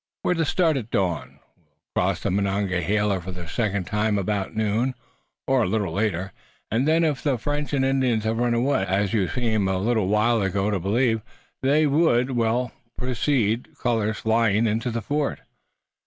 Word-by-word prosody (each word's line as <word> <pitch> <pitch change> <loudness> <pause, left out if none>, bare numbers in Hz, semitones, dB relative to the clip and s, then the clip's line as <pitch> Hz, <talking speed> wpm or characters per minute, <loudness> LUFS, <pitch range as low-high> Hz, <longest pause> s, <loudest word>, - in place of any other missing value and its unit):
"We're - - +2
to 165 -2 0
start 160 -1 +2
at 115 -4 -5
dawn. 90 -6 -1 0.2
We'll - - -37 0.4
cross - - -1
the - - -1
Monongahela 100 0 0
for 90 - -8
the 90 -1 -8
second 100 +1 -1
time 105 +1 0
about 100 +1 -2
noon, 110 +4 0 0.5
or 130 -1 +2
a - - +1
little 105 -6 -1
later, 95 -2 -1 0.4
and 120 +6 +1
then, 165 +2 +3
if 150 -5 0
the 140 -4 +1
French 145 +4 -3
and 135 -2 +1
Indians 130 -5 +1
have 110 +1 -1
run 120 -1 +2
away, 130 -1 +1
as 95 +1 0
you 100 -5 +2
seemed 110 -6 0
a 95 - 0
little 110 0 +1
while 110 +3 +2
ago 100 +1 0
to 100 - 0
believe 110 +5 +1 0.4
they 145 +4 +3
would, 140 -4 +3
we'll 120 +1 0 0.3
proceed, 125 -3 0
colors 110 -3 0
flying 110 -1 +2
into 115 +3 0
the 115 -1 -3
fort." 145 0 -1
110 Hz, 175 wpm, -24 LUFS, 100-130 Hz, 0.5 s, then